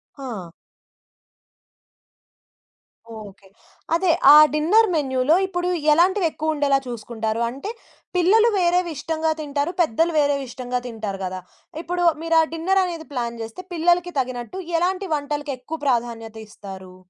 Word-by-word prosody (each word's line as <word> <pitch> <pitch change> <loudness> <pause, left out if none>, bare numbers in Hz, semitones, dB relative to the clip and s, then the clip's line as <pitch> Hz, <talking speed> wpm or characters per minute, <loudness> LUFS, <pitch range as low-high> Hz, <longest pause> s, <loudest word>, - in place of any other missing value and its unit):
ఆ! 230 - -7 2.7
ఓకే. 200 -2 -12 0.5
అదే. 350 0 +2 0.2
ఆ - - +10 0.2
డిన్నర్ 365 +10 +4
మెన్యూలో 265 0 +2
ఇప్పుడు 355 -1 -2 0.2
ఎలాంటివెక్కువుండేలా 315 -5 +2
చూసుకుంటారు? 225 -1 -4
అంటే 275 - -7 0.5
పిల్లలు 420 +6 +4
వేరేవి 355 -1 +2
ఇష్టంగా 320 +1 -1
తింటారు, 290 +2 -2
పెద్దలు 330 +3 +1
వేరేవి 285 -2 +1
ఇష్టంగా 250 0 -4
తింటారు 215 -4 -5
గదా! 185 0 -5 0.4
ఇప్పుడు 350 +1 -1 0.2
మీరా 330 0 +3
డిన్నర్ 375 +4 +1
అనేది 335 -3 -6
ప్లాన్ 235 -2 -3
చేస్తే 225 +11 -8
పిల్లలకి 350 +1 +1
తగినట్టు 255 +6 -4 0.2
ఎలాంటి 375 +3 -1
వంటలకెక్కువ 290 0 -5
ప్రాధాన్యత 230 -3 -1
ఇస్తారు? 190 -3 -11
290 Hz, 110 wpm, -22 LUFS, 235-345 Hz, 2.7 s, ఆ